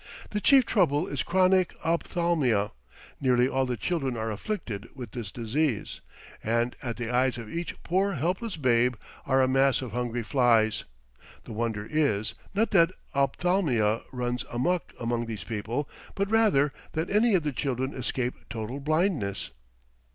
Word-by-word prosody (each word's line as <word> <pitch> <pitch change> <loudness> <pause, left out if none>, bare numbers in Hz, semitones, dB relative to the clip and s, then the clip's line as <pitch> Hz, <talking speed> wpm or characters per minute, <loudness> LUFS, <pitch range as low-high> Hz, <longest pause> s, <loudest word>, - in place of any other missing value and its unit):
The 210 - -1
chief 270 +1 +6
trouble 170 -8 +2
is 140 -6 -2
chronic 185 0 +3
ophthalmia; 165 - +1 0.5
nearly 125 -2 +3
all 135 0 0
the 125 -1 -2
children 135 -8 -1
are 110 0 -2
afflicted 115 - -4
with 125 -5 -7
this 110 -5 -5
disease, 120 +3 -1 0.4
and 115 +2 +1
at 120 -2 -4
the 120 -1 -3
eyes 125 0 +2
of 115 -2 -7
each 170 +1 -3
poor 195 +3 +1
helpless 180 - -1
babe 125 -4 +2 0.3
are 135 -1 +4
a - - +3
mass 135 0 +3
of 130 -3 -5
hungry 120 0 -2
flies. 115 -3 +3 0.6
The - - -8
wonder 110 -2 -2
is, 115 -9 +1 0.2
not 220 +3 +2
that 170 -5 +5 0.2
ophthalmia 140 - +2
runs 125 -1 -2
amuck 170 +9 0
among 120 0 -1
these 110 -2 -5
people, 115 +5 -3 0.3
but 200 +1 -1
rather, 200 -11 +4 0.2
that 160 +2 -2
any 215 +1 +4
of 175 - +2
the 150 -2 -1
children 130 0 -2
escape 125 0 -2 0.2
total 115 +4 -4
blindness. 145 - 0
130 Hz, 150 wpm, -27 LUFS, 115-170 Hz, 0.6 s, chief